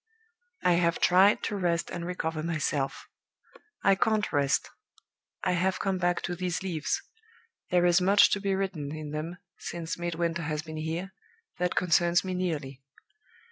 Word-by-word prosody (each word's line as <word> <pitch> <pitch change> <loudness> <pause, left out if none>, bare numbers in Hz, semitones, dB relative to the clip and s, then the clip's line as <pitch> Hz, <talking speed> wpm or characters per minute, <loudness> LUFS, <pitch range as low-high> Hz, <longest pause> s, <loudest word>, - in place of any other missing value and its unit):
"I 180 - +5
have 170 0 +1
tried 190 +3 +5
to 210 - -2
rest 175 -2 0
and 175 -1 -4
recover 165 -3 -2
myself. 155 -4 -2 0.8
I 195 - +6
can't 215 +2 +1
rest. 140 -1 +2 0.8
I - - +2
have 185 +2 +1
come 195 -2 -1
back 175 0 +1
to 175 - -2
these 180 0 -2
leaves. 165 -5 -2 0.7
There 175 0 +3
is 175 +1 +5
much 200 +3 +6
to 200 - +1
be 195 -1 0
written 170 -7 -3
in 155 -1 -6
them 155 +3 -4 0.2
since 170 0 -5
Midwinter 170 -1 -1
has 150 -1 -2
been 155 -1 -7
here, 165 +5 -4 0.5
that 180 0 0
concerns 175 0 +3
me 185 -1 -3
nearly. 150 -7 -3
175 Hz, 155 wpm, -28 LUFS, 160-185 Hz, 0.8 s, I